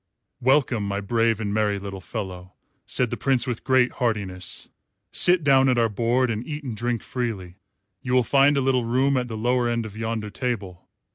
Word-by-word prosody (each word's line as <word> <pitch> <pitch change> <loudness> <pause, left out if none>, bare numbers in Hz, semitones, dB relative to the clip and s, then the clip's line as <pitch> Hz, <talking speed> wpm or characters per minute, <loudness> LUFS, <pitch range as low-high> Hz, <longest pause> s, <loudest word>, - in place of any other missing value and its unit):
"Welcome, 125 -5 +2
my 100 0 -2
brave 115 +1 +1
and 100 -2 -2
merry 105 -1 +1
little 100 -1 -7
fellow," 95 -3 -7 0.3
said 125 -3 0
the - - -3
Prince 130 -3 +2
with 120 -3 -4
great 130 -1 +3
heartiness; 100 -6 -2 0.4
"sit 175 -2 +4
down 135 -2 +5
at 125 - +2
our 115 -1 +3
board 120 +4 +1
and 110 +1 -3
eat 150 +2 -6
and 125 -5 -5
drink 120 +1 -2
freely. 100 -8 -4 0.4
You 125 - -3
will 125 - +4
find 140 +3 +4
a - - +2
little 130 -2 +2
room 130 +4 +1
at 125 -1 0
the 110 -2 -5
lower 120 +2 +1
end 115 -1 -1
of 105 -2 -9
yonder 110 -1 -3
table. 105 -8 -4
115 Hz, 195 wpm, -24 LUFS, 105-130 Hz, 0.4 s, down